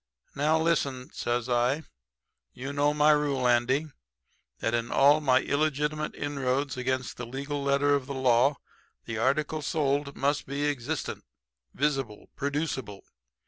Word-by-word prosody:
"'Now 155 Hz, +3 st, +2 dB
listen,' 140 Hz, -5 st, 0 dB
says 120 Hz, 0 st, -1 dB
I. 125 Hz, +5 st, +1 dB, 0.7 s
'You 135 Hz, +3 st, -6 dB
know 145 Hz, +1 st, +2 dB
my 150 Hz, +1 st, +4 dB
rule, 145 Hz, -4 st, +2 dB
Andy, 125 Hz, +5 st, +2 dB, 0.7 s
that 115 Hz, -, -1 dB
in 120 Hz, 0 st, -1 dB
all 145 Hz, +3 st, +5 dB
my 130 Hz, -3 st, +4 dB
illegitimate 150 Hz, +1 st, -1 dB
inroads 140 Hz, -1 st, -1 dB
against 130 Hz, 0 st, -2 dB
the 120 Hz, -, -5 dB
legal 140 Hz, +3 st, -4 dB
letter 140 Hz, +1 st, +3 dB
of 140 Hz, -2 st, 0 dB
the 140 Hz, -, -4 dB
law 130 Hz, +2 st, +3 dB, 0.5 s
the 115 Hz, -1 st, -4 dB
article 150 Hz, +5 st, +1 dB
sold 140 Hz, -1 st, -1 dB
must 145 Hz, +1 st, 0 dB
be 140 Hz, +2 st, -2 dB
existent, 140 Hz, -5 st, -3 dB, 0.5 s
visible, 135 Hz, -7 st, -1 dB
producible. 140 Hz, -8 st, -3 dB
140 Hz, 135 wpm, -28 LUFS, 125-145 Hz, 0.7 s, all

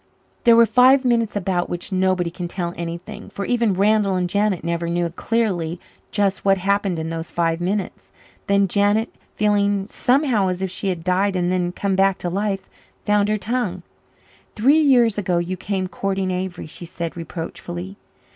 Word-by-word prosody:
There 235 Hz, -1 st, +7 dB
were 230 Hz, 0 st, +7 dB
five 255 Hz, +4 st, +5 dB
minutes 230 Hz, -3 st, +1 dB
about 180 Hz, -3 st, -1 dB
which 175 Hz, +3 st, -5 dB
nobody 185 Hz, -2 st, +1 dB
can 175 Hz, +1 st, -5 dB
tell 175 Hz, -1 st, -3 dB
anything, 170 Hz, +5 st, -7 dB
for 200 Hz, -, -5 dB
even 235 Hz, -4 st, +1 dB
Randall 205 Hz, 0 st, +2 dB
and 180 Hz, -1 st, 0 dB
Janet 200 Hz, -1 st, 0 dB
never 170 Hz, 0 st, -2 dB
knew 175 Hz, 0 st, 0 dB
clearly 180 Hz, -5 st, -1 dB, 0.3 s
just 195 Hz, -2 st, 0 dB
what 195 Hz, -1 st, +4 dB
happened 195 Hz, -1 st, 0 dB
in 160 Hz, 0 st, -4 dB
those 165 Hz, 0 st, -5 dB
five 165 Hz, 0 st, 0 dB
minutes. 195 Hz, +2 st, -3 dB, 0.4 s
Then 200 Hz, 0 st, +3 dB
Janet, 205 Hz, +4 st, +1 dB, 0.2 s
feeling 205 Hz, -1 st, +1 dB
somehow 250 Hz, -6 st, +2 dB
as 185 Hz, +1 st, -2 dB
if 190 Hz, -, -2 dB
she 195 Hz, -, -3 dB
had 180 Hz, -4 st, -2 dB
died 190 Hz, +2 st, +1 dB
and 180 Hz, 0 st, 0 dB
then 180 Hz, -1 st, 0 dB
come 195 Hz, +1 st, -1 dB
back 195 Hz, 0 st, +3 dB
to 175 Hz, -, -3 dB
life, 195 Hz, +1 st, -2 dB, 0.4 s
found 210 Hz, -1 st, +2 dB
her 215 Hz, -, +1 dB
tongue. 240 Hz, +4 st, -2 dB, 0.7 s
"Three 270 Hz, +9 st, +4 dB
years 240 Hz, -7 st, +4 dB
ago 185 Hz, -3 st, 0 dB
you 175 Hz, +2 st, -2 dB
came 190 Hz, 0 st, -2 dB
courting 195 Hz, 0 st, -2 dB
Avery," 180 Hz, -1 st, -4 dB
she 160 Hz, +2 st, -8 dB
said 170 Hz, 0 st, -5 dB
reproachfully. 175 Hz, +2 st, -6 dB
195 Hz, 175 wpm, -21 LUFS, 175-210 Hz, 0.7 s, There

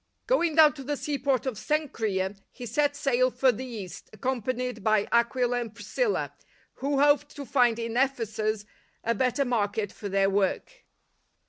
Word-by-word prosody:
Going 340 Hz, -11 st, +2 dB
down 310 Hz, -2 st, +7 dB
to 275 Hz, -, -9 dB
the 290 Hz, +2 st, -2 dB
seaport 275 Hz, -3 st, -1 dB
of 250 Hz, -6 st, -3 dB
Cenchrea, 215 Hz, -10 st, -1 dB
he 250 Hz, -, -9 dB
set 290 Hz, +5 st, +1 dB
sail 255 Hz, -3 st, +2 dB
for 255 Hz, +1 st, +3 dB
the 255 Hz, +3 st, -6 dB
East, 210 Hz, -7 st, -8 dB
accom 245 Hz, +2 st, -3 dB
panied 250 Hz, -1 st, -3 dB
by 215 Hz, 0 st, +2 dB
Aquila 245 Hz, +1 st, +2 dB
and 225 Hz, -2 st, -7 dB
Priscilla, -, -, -1 dB, 0.4 s
who 280 Hz, +1 st, -1 dB
hoped 290 Hz, 0 st, +3 dB
to 285 Hz, -, -6 dB
find 245 Hz, -4 st, +3 dB
in 230 Hz, 0 st, -4 dB
Ephesus 220 Hz, -5 st, 0 dB, 0.4 s
a 230 Hz, -, +1 dB
better 255 Hz, +4 st, +1 dB
market 210 Hz, -4 st, -1 dB
for 205 Hz, -, -7 dB
their 195 Hz, 0 st, +2 dB
work. 200 Hz, -, -1 dB
245 Hz, 160 wpm, -27 LUFS, 220-280 Hz, 0.4 s, down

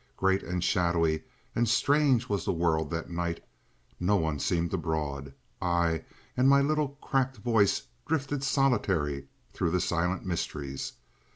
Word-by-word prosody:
Great 95 Hz, 0 st, +2 dB
and 90 Hz, 0 st, -3 dB
shadowy 85 Hz, -4 st, +2 dB, 0.3 s
and 120 Hz, -1 st, +2 dB
strange 135 Hz, -1 st, +3 dB
was 100 Hz, -3 st, -1 dB
the -, -, 0 dB
world 80 Hz, -3 st, +1 dB
that 85 Hz, +1 st, -4 dB
night, 85 Hz, 0 st, -2 dB, 0.6 s
no 95 Hz, +4 st, +2 dB
one 80 Hz, -5 st, 0 dB
seemed 85 Hz, +3 st, 0 dB
abroad; 75 Hz, -5 st, -2 dB, 0.3 s
I 85 Hz, -2 st, +1 dB, 0.3 s
and 130 Hz, +2 st, +4 dB
my 140 Hz, 0 st, +7 dB
little 145 Hz, 0 st, 0 dB
cracked 135 Hz, -1 st, 0 dB
voice 110 Hz, -3 st, +2 dB, 0.2 s
drifted 145 Hz, -3 st, -1 dB
solitary 95 Hz, -, +1 dB, 0.3 s
through 85 Hz, -, 0 dB
the 90 Hz, +2 st, +1 dB
silent 90 Hz, +2 st, 0 dB
mysteries. 75 Hz, -6 st, -3 dB
90 Hz, 135 wpm, -29 LUFS, 80-125 Hz, 0.6 s, my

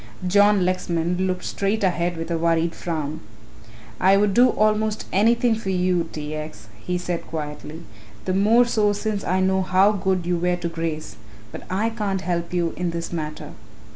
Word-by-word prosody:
John 205 Hz, 0 st, +4 dB
Lexman 180 Hz, 0 st, 0 dB
looked 185 Hz, -1 st, -2 dB
straight 200 Hz, +2 st, -1 dB
ahead 175 Hz, -2 st, 0 dB
with 165 Hz, +1 st, -5 dB
a 165 Hz, -, +1 dB
worried 165 Hz, 0 st, +1 dB
frown. 155 Hz, -3 st, -4 dB, 0.8 s
"I 190 Hz, +2 st, +5 dB
would 205 Hz, -1 st, +2 dB
do 245 Hz, +4 st, +6 dB
almost 215 Hz, -1 st, +1 dB
anything 230 Hz, +4 st, +3 dB
for 220 Hz, -3 st, -4 dB
you, 180 Hz, -2 st, +1 dB
T. 150 Hz, 0 st, -5 dB
X.," 155 Hz, 0 st, -7 dB
he 180 Hz, 0 st, -2 dB
said 175 Hz, -1 st, -4 dB
quietly, 155 Hz, +1 st, -6 dB, 0.4 s
"the 185 Hz, -, 0 dB
more 220 Hz, +6 st, +4 dB
so 210 Hz, -3 st, +2 dB
since 205 Hz, 0 st, -3 dB
I 185 Hz, +1 st, +1 dB
know 190 Hz, 0 st, +2 dB
how 185 Hz, +2 st, +4 dB
good 190 Hz, -3 st, -1 dB
you 175 Hz, 0 st, 0 dB
were 180 Hz, +1 st, +1 dB
to 175 Hz, -1 st, -4 dB
Grace, 165 Hz, -2 st, -4 dB, 0.3 s
but -, -, -9 dB
I 210 Hz, +5 st, 0 dB
can't 205 Hz, -4 st, -2 dB
help 170 Hz, -2 st, -2 dB
you 175 Hz, -2 st, 0 dB
in 180 Hz, -1 st, -2 dB
this 170 Hz, +1 st, -5 dB
matter. 155 Hz, -2 st, -5 dB
180 Hz, 175 wpm, -23 LUFS, 170-205 Hz, 0.8 s, do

